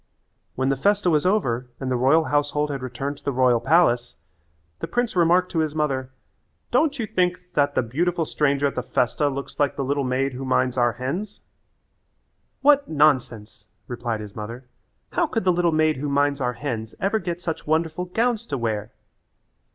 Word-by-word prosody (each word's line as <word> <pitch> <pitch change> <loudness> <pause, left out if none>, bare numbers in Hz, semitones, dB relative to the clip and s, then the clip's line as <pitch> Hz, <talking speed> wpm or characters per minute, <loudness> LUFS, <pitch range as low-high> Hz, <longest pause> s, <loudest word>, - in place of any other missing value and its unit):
When 130 +1 0
the 135 - +1
festa 200 +3 +2
was 155 +2 +2
over 125 - 0
and 130 -1 -3
the - - +2
royal 135 +6 +4
household 145 0 0
had 135 -2 -4
returned 135 +3 -4
to - - -31
the 140 - -1
royal 125 -2 +3
palace, 125 -5 +2 0.6
the - - -4
prince 245 -3 -1
remarked 180 +1 +3
to 165 - 0
his 155 -1 -1
mother, 135 -4 -1 0.6
"Don't 295 -3 +2
you 230 - -2
think 180 -3 0
that 145 -1 +1
the - - +2
beautiful 165 +8 -1
stranger 140 -2 +1
at 140 - +1
the 125 - -2
festa 125 +4 0
looks 140 0 -6
like 145 -2 +1
the 140 - -2
little 140 +1 0
maid 130 +1 0
who 130 +2 -6
minds 130 -1 +1
our 120 -2 +2
hens?" 155 - -5 1.2
"What 285 0 +4
nonsense," 130 -8 +1 0.2
replied 120 -2 -3
his 105 -2 -10
mother. 115 +4 -7 0.5
"How 335 - +1
could 225 -7 -2
the 180 -1 +3
little 175 -1 +2
maid 155 -1 +2
who 145 +2 -3
minds 140 0 +1
our 125 -1 0
hens 115 -5 -5
ever 200 +3 +1
get 175 -2 -4
such 165 -3 -5
wonderful 160 +2 0
gowns 230 +4 -1
to 140 - -2
wear?" 110 -2 -2
145 Hz, 185 wpm, -23 LUFS, 130-175 Hz, 1.2 s, royal